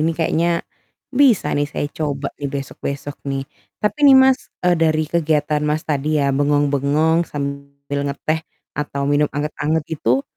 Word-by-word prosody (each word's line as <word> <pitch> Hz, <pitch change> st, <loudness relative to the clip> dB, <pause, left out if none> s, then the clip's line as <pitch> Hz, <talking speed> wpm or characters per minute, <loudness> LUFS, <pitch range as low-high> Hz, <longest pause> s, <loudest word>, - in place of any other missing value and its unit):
ini 160 Hz, +2 st, +2 dB
kayaknya, 170 Hz, +1 st, +1 dB, 0.5 s
bisa 255 Hz, -5 st, +4 dB
nih 145 Hz, 0 st, 0 dB
saya 145 Hz, -, -3 dB
coba 145 Hz, -2 st, -3 dB
nih, 140 Hz, -, -2 dB
besok-besok 140 Hz, +1 st, -5 dB
nih. 135 Hz, 0 st, -2 dB, 0.4 s
Tapi 210 Hz, +8 st, 0 dB
nih 270 Hz, -, +9 dB
Mas, 265 Hz, 0 st, +4 dB, 0.2 s
eee, 180 Hz, -1 st, +4 dB
dari 155 Hz, -1 st, +2 dB
kegiatan 155 Hz, -2 st, +1 dB
Mas 150 Hz, +1 st, 0 dB
tadi 150 Hz, +1 st, 0 dB
ya 140 Hz, -1 st, +1 dB
bengong-bengong 145 Hz, +3 st, +2 dB
sambil 140 Hz, 0 st, -5 dB
ngeteh 155 Hz, +3 st, -2 dB, 0.3 s
atau 145 Hz, -1 st, -3 dB
minum 145 Hz, +1 st, +2 dB
anget-anget 150 Hz, +1 st, -1 dB, 0.2 s
itu, 125 Hz, +4 st, +2 dB
150 Hz, 145 wpm, -20 LUFS, 140-160 Hz, 0.5 s, nih